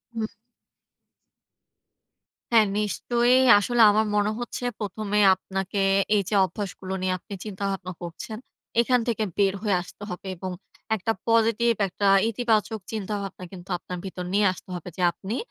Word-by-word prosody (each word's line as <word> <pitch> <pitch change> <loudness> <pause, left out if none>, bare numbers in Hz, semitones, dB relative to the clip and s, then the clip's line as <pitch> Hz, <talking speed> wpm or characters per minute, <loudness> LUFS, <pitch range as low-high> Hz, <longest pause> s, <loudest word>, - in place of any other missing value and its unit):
হু। 225 -1 -1 2.3
হ্যাঁ, 220 -2 +6
নিশ্চয়ই 240 +5 +2 0.2
আসলে 240 +3 +1
আমার 215 +1 +2
মনে 205 0 +2
হচ্ছে, 240 +1 -5 0.2
১ম 210 +1 -4
এ - - +5
আপনাকে 190 +1 -4 0.4
এই 205 - +4
যে 210 - 0
অভ্যাসগুলো 190 -1 -6
নিয়ে 185 0 0
আপনি 200 - -11
চিন্তাভাবনা 195 -2 -4
করছেন, 175 +6 -7 0.4
এখান 250 +1 +3
থেকে 225 -2 0
বের 195 -1 +3
হয়ে 205 -4 +1
আসতে 185 +3 -12
হবে, 180 +2 -7
এবং 185 +1 -5 0.4
একটা 220 +2 -1 0.2
পজিটিভ, 230 +1 +3
একটা 200 +2 -1 0.2
ইতিবাচক 225 -1 0
চিন্তাভাবনা 200 -3 -4
কিন্তু 185 -1 -11
আপনার 180 +1 -7
ভিতর 180 -1 -5
নিয়ে 205 +1 +3
আসতে 185 - -15
হবে। 175 0 -7
যে - - -3
আপনি 200 +6 -5
205 Hz, 145 wpm, -25 LUFS, 190-225 Hz, 2.3 s, হ্যাঁ